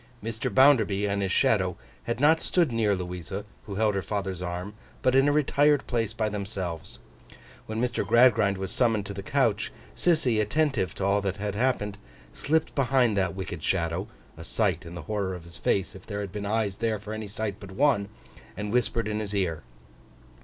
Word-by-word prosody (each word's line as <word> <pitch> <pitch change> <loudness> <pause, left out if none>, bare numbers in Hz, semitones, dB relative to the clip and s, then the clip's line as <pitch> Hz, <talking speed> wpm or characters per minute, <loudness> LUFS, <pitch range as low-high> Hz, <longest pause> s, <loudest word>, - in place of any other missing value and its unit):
Mr. 115 0 -3
Bounderby 110 -8 +5
and 100 0 0
his 95 -1 -1
shadow - - +2 0.3
had 120 +1 -2
not 155 +3 +5
stood 170 -7 +2
near 110 -3 +2
Louisa, 90 +2 -5 0.2
who 100 - -5
held 110 +1 +2
her 100 - -1
father's 95 0 -3
arm, 90 +3 -4 0.3
but 130 - +3
in 135 +1 +5
a - - +4
retired 145 -1 +3
place 115 -4 -1
by 110 - -1
themselves. 100 -5 -5 0.7
When 110 +1 -3
Mr. 125 0 0
Gradgrind 115 -5 +4
was 95 0 -4
summoned 110 -4 +1
to 100 - -5
the 100 - -5
couch, 115 -1 +1 0.2
Sissy, 130 -11 +3
attentive 110 - 0
to 95 - -2
all 100 +1 +3
that 100 -1 -2
happened, 105 0 -1 0.3
slipped 160 +2 0
behind 130 -4 +2
that 95 -2 0
wicked 95 -4 -5
shadow—a 85 +1 -3
sight 95 -3 0
in 85 - -8
the 85 - -7
horror 100 +1 -2
of 90 - -9
his 85 0 -12
face, 95 +2 0
if 95 - -13
there 100 -1 -3
had 100 -3 -5
been 100 +1 -4
eyes 105 -2 0
there 115 -2 0
for 105 +1 -7
any 110 -1 -5
sight 105 0 -3
but 100 - -10
one—and 105 -3 -2
whispered 120 -2 +1
in 105 0 -1
his 105 -1 -3
ear. 90 -5 0
105 Hz, 185 wpm, -27 LUFS, 95-120 Hz, 0.7 s, Bounderby